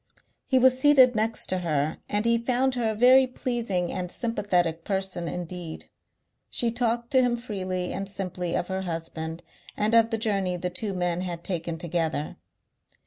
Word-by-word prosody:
He 260 - +3
was 255 0 +5
seated 260 -3 +6
next 225 +1 0
to 185 - 0
her 155 -3 -1
and 210 +1 0
he 235 0 +3
found 255 +2 +1
her 240 -3 0
a 220 - -2
very 255 +3 +6
pleasing 235 -8 -2
and 180 -1 -3
sympathetic 180 -7 0
person 190 -3 -2
indeed. 175 -1 -6 0.6
She 235 -1 +1
talked 235 0 -1
to 260 -2 +5
him 245 -1 +1
freely 185 -6 -3
and 195 +1 -4
simply 180 -3 -3
of 175 -1 -1
her 190 0 -2
husband 165 -1 -5 0.3
and 215 +2 +1
of 230 -1 +6
the 225 - 0
journey 195 -5 0
the 180 +1 -3
two 195 +2 -3
men 175 -1 -1
had 175 -2 -5
taken 170 -2 -3
together. 160 -2 -2
195 Hz, 170 wpm, -26 LUFS, 175-235 Hz, 0.6 s, seated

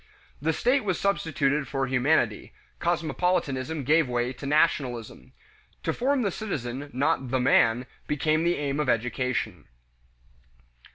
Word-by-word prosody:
The 160 +2 +1
"state" 250 - +2
was 190 -5 -1
substituted 150 -7 0
for 135 +1 -1
humanity; 125 -4 +1 0.3
cosmopolitanism 160 -4 -1
gave 155 +1 +3
way 120 +1 -1
to 135 +2 -8
nationalism. 135 -6 0 0.5
To - - 0
form 265 +1 +1
the 200 - 0
citizen, 145 - -4
not 135 0 0
the 130 +1 +1
"man," 125 -1 +3 0.2
became 155 +2 +1
the 175 +1 +2
aim 145 0 -2
of 150 -4 0
education. 115 -3 -1
140 Hz, 125 wpm, -26 LUFS, 125-165 Hz, 0.5 s, gave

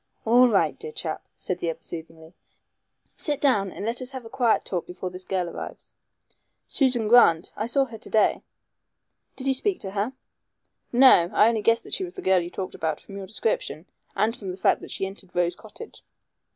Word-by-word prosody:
"All 245 +3 +6
right, 210 -5 +3
my - - -29
dear 460 - -7
chap," - - -4
said 180 -1 -3
the 170 - -1
other 165 0 -6
soothingly, 160 0 -9 0.8
"sit 295 -3 -1
down 205 -9 +2
and 200 - -6
let 230 +3 -1
us 255 +1 -5
have 260 -3 -7
a 225 - -11
quiet 245 -4 +2
talk 180 -3 -3
before 180 +1 -6
this 185 0 -5
girl 185 -2 -1
arrives." - - -8 0.7
"Susan 250 -6 +1
Grant. 200 -8 +5
I 215 - -2
saw 275 +3 +3
her 230 -4 -10
to - - -9
day." 220 - +3 0.9
"Did 265 - -7
you 270 - +3
speak 365 +9 0
to 195 - -3
her?" 205 +6 -2 0.8
"No. 245 -9 +7
I 215 - +5
only 225 -2 0
guessed 230 +2 +3
that - - -10
she 385 - 0
was 360 -1 -7
the - - -7
girl 190 -1 +4
you 170 0 -4
talked 185 +1 -5
about 160 -2 -2
from 195 - -12
your 195 -1 -7
description 465 - -2 0.3
and 225 +2 +1
from 195 -5 -7
the 180 - -5
fact - - +2
that - - -10
she - - -2
entered 190 -1 -10
Rose 175 0 +1
Cottage." 420 - -12
215 Hz, 210 wpm, -25 LUFS, 180-255 Hz, 0.9 s, No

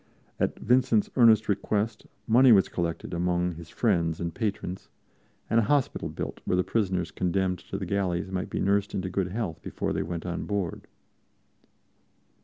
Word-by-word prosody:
At - - 0
Vincent's 125 -3 +2
earnest 115 -4 +6
request, 105 +2 -1 0.2
money 125 +3 +6
was 100 -4 +5
collected 85 -1 -3
among 90 0 0
his 85 0 -11
friends 85 -8 +1
and 85 -1 -3
patrons, 95 -4 -4 0.6
and 115 - +3
a - - +3
hospital 145 -3 +1
built - - -6
where 90 - 0
the 90 - +3
prisoners 95 -7 -1
condemned 90 0 0
to - - -6
the - - -4
galleys 95 -2 -1
might 95 -1 -3
be - - -3
nursed 100 +1 +1
into 95 0 -2
good 95 0 0
health 95 -4 -4
before - - -3
they - - -1
went 85 0 -4
on 85 -1 -3
board. 100 -5 -3
95 Hz, 165 wpm, -27 LUFS, 90-110 Hz, 0.6 s, earnest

